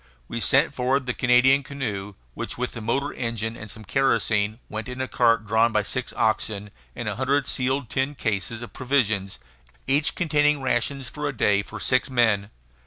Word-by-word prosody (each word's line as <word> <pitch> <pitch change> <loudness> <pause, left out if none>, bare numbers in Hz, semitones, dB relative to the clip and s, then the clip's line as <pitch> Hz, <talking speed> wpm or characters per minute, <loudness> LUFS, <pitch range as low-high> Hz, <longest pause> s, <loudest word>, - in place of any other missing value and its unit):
We 115 - -4
sent 140 +4 +3
forward 130 +1 +1
the 125 - -1
Canadian 125 +3 +4
canoe 105 -8 -5 0.2
which, - - -5
with 125 0 -2
the 115 - -7
motor 135 +6 -1
engine 115 -2 -3
and 105 -2 -9
some 110 +2 -9
kerosene, 110 -4 +1
went 110 +3 -5
in 125 +1 -6
a 130 - -1
cart 115 -1 +3
drawn 110 +2 +3
by 105 -1 +2
six 130 +5 -3
oxen 105 -2 0 0.2
and 120 -2 -5
a 105 0 -2
hundred 135 +2 +1
sealed 130 -1 0
tin 135 +2 -1
cases 110 0 -2
of 120 - -10
provisions, 110 -8 0 0.5
each 145 +3 +1
containing 150 -3 +2
rations 130 +1 -1
for 150 +3 -4
a 135 - -7
day 100 -1 +3
for 105 +1 -9
six 130 +6 +1
men. 110 -5 +2
120 Hz, 180 wpm, -24 LUFS, 110-135 Hz, 0.5 s, Canadian